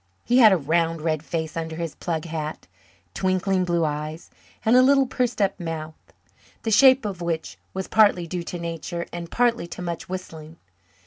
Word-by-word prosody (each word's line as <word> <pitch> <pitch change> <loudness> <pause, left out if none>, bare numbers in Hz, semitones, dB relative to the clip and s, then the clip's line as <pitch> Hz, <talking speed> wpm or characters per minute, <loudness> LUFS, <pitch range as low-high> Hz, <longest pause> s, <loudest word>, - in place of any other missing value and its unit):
He 245 +2 +4
had 220 -4 +8
a 190 - +4
round 165 +1 0
red 155 -2 0
face 160 -1 -4
under 160 -1 -4
his 165 -2 -4
plug 165 -2 -3
hat, 155 -2 -5 0.5
twinkling 185 0 0
blue 170 -2 +1
eyes, 150 +2 -5 0.3
and 225 +2 +5
a 255 - +8
little 275 +1 +5
pursed 245 -2 -1
up 200 -1 +1
mouth, 160 -2 -5 0.7
the 225 - -1
shape 260 +2 +6
of 190 -4 -4
which 165 -2 -3 0.2
was 190 0 -3
partly 205 -5 +4
due 175 +1 -4
to 175 - -5
nature 170 0 -5
and 170 -1 -6
partly 235 -6 +1
to 170 - -8
much 170 -1 -5
whistling. 165 -4 -7
170 Hz, 180 wpm, -24 LUFS, 160-200 Hz, 0.7 s, had